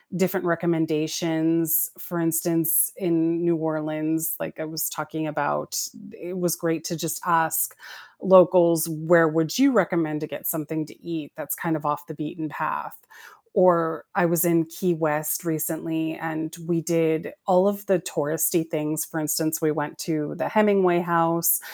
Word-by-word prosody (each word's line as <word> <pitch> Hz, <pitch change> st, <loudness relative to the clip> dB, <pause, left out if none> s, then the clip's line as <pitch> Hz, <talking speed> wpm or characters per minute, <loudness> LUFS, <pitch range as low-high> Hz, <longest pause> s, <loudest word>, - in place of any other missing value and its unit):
different 185 Hz, +1 st, 0 dB
recommendations. 165 Hz, -1 st, +1 dB
For 175 Hz, -1 st, -5 dB
instance, 165 Hz, 0 st, +2 dB
in 170 Hz, -2 st, 0 dB
New 170 Hz, -1 st, +2 dB
Orleans, 155 Hz, 0 st, -2 dB
like -, -, -7 dB
I 155 Hz, -, -4 dB
was 160 Hz, 0 st, -2 dB
talking 155 Hz, 0 st, -5 dB
about, 145 Hz, -, -2 dB, 0.4 s
it 180 Hz, +2 st, -9 dB
was 175 Hz, -2 st, 0 dB
great 165 Hz, -2 st, -2 dB
to 170 Hz, -, -3 dB
just 165 Hz, 0 st, -3 dB
ask 160 Hz, -2 st, +2 dB, 0.5 s
locals, 180 Hz, -3 st, +6 dB
"Where 165 Hz, +1 st, +4 dB
would 160 Hz, 0 st, 0 dB
you 275 Hz, +2 st, +5 dB
recommend 170 Hz, -8 st, +1 dB
to 155 Hz, -, -4 dB
get -, -, -6 dB
something 155 Hz, -1 st, -3 dB
to -, -, -15 dB
eat 160 Hz, -4 st, -6 dB
that's 145 Hz, -, -4 dB
kind 165 Hz, -2 st, -2 dB
of 155 Hz, -1 st, -6 dB
off 145 Hz, 0 st, -2 dB
the 160 Hz, -, -8 dB
beaten 155 Hz, +1 st, -6 dB
path?" -, -, -4 dB, 0.6 s
Or 165 Hz, -4 st, +3 dB
I -, -, +3 dB
was 170 Hz, 0 st, +2 dB
in 170 Hz, -1 st, +3 dB
Key 175 Hz, +2 st, -2 dB
West 155 Hz, +1 st, -1 dB
recently 160 Hz, 0 st, -2 dB
and 160 Hz, +1 st, -5 dB
we 170 Hz, -1 st, 0 dB
did 165 Hz, -, 0 dB
all 185 Hz, 0 st, +4 dB
of 205 Hz, 0 st, -2 dB
the 190 Hz, -3 st, +2 dB
touristy 165 Hz, 0 st, 0 dB
things. 155 Hz, -1 st, -2 dB
For 160 Hz, -, -5 dB
instance, 155 Hz, +2 st, -1 dB
we 155 Hz, -, +2 dB
went 150 Hz, -1 st, -4 dB
to 155 Hz, -3 st, -3 dB
the -, -, -1 dB
Hemingway 195 Hz, -5 st, +4 dB
House, 170 Hz, -1 st, +3 dB
165 Hz, 160 wpm, -24 LUFS, 155-170 Hz, 0.6 s, locals